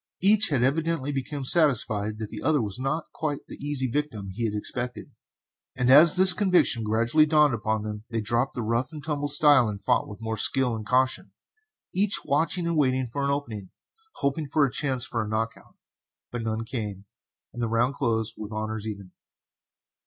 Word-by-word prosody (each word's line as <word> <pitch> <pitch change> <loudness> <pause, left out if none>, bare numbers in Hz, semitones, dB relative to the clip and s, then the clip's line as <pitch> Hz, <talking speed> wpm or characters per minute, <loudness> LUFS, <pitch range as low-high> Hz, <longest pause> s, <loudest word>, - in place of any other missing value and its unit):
Each 215 +2 +4
had 135 -5 +1
evidently 150 +1 -1
become 140 0 -5
satisfied 110 -9 +2
that 110 -1 -7
the - - -7
other 150 +2 +2
was 105 0 -3
not 150 +5 -3
quite 150 -3 -4
the - - -11
easy 145 -2 -2
victim 125 -6 -3
he 115 +5 -3
had 105 -2 -2
expected; 120 +4 -5 0.7
and 125 0 +2
as 150 +4 +8
this 185 0 +8
conviction 180 - +2
gradually 115 +8 +2
dawned 150 -2 +3
upon 110 -1 -2
them 105 0 -6
they 115 -1 -2
dropped 120 +5 -1
the 120 - -3
rough 120 +5 -1
and 150 -2 -9
tumble 145 -1 -2
style 145 -4 +4
and 100 -1 -7
fought - - +1
with 105 - -10
more 110 -1 -4
skill 130 -1 +2
and 110 -1 -7
caution, 130 0 0 0.6
each 200 +2 +1
watching 165 +5 0
and 170 -1 -1
waiting 130 -3 +1
for 140 +4 -5
an 140 - 0
opening, 115 -9 -4 0.5
hoping 140 +2 -2
for 145 +1 +2
a 135 - -3
chance 130 -3 0
for 115 -3 -3
a - - -7
"knock 110 +1 -1
out," - - -20 0.6
but 120 - -4
none 110 0 -3
came, 105 -5 -6 0.5
and 120 - -6
the 115 - -1
round 120 +4 +1
closed 115 -5 -1
with 105 0 -8
honors 110 0 -4
even. 100 -4 -8
125 Hz, 190 wpm, -25 LUFS, 110-145 Hz, 0.7 s, as